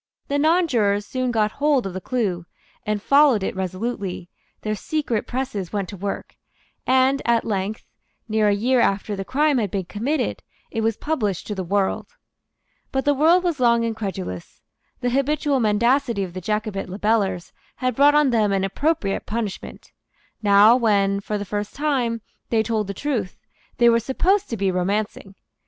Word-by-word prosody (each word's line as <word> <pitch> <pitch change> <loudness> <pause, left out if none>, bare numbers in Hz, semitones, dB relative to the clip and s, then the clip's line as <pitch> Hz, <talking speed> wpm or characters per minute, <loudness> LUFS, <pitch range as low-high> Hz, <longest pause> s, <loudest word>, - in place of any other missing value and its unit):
The 285 0 +1
nonjurors 255 - +2
soon 255 +3 -2
got 215 -3 +1
hold 285 -3 +1
of 190 - -4
the 185 - -5
clue, 185 -8 -2 0.4
and 210 -1 0
followed 275 -2 +4
it - - -2
resolutely; 190 -1 -4 0.3
their 215 - -2
secret 240 0 -2
presses 245 -8 -3
went 200 -4 -2
to 205 - -7
work; 200 +1 -5 0.5
and 260 +2 +3
at 235 -1 +2
length, 205 0 -3 0.4
near 215 -1 +2
a - - +4
year 245 +5 +2
after 205 -1 +1
the 195 - -4
crime 285 +4 +2
had 210 -3 -1
been 190 0 -3
committed, 240 - -2 0.3
it 225 - -2
was 225 -1 0
published 215 - -2
to 210 - -4
the 190 -2 -4
world. 195 +2 0 0.8
But 265 0 -1
the 290 - +4
world 325 +6 +4
was 340 -6 -1
long 235 -2 +3
incredulous. 195 - -5 0.4
The 245 - 0
habitual 280 +1 +1
mendacity 235 0 +2
of 180 -2 -6
the 185 - -6
Jacobite 210 0 -2
libellers 195 -2 0 0.2
had 255 -1 -1
brought 285 +3 +5
on 295 -3 +4
them 215 -3 +2
an 195 -1 +1
appropriate 200 - -1
punishment. 215 -3 -5 0.5
Now, 205 +2 +6
when, 200 -5 +2
for 210 +1 -3
the 205 - -5
first 205 +1 -4
time, 260 -6 0 0.3
they 225 -2 +2
told 220 -3 -1
the 200 - -5
truth, 230 -8 -3 0.4
they 240 - +5
were 230 0 +5
supposed 370 - +1
to 230 - -3
be 195 -1 +1
romancing. 195 +1 -2
220 Hz, 170 wpm, -22 LUFS, 200-260 Hz, 0.8 s, Now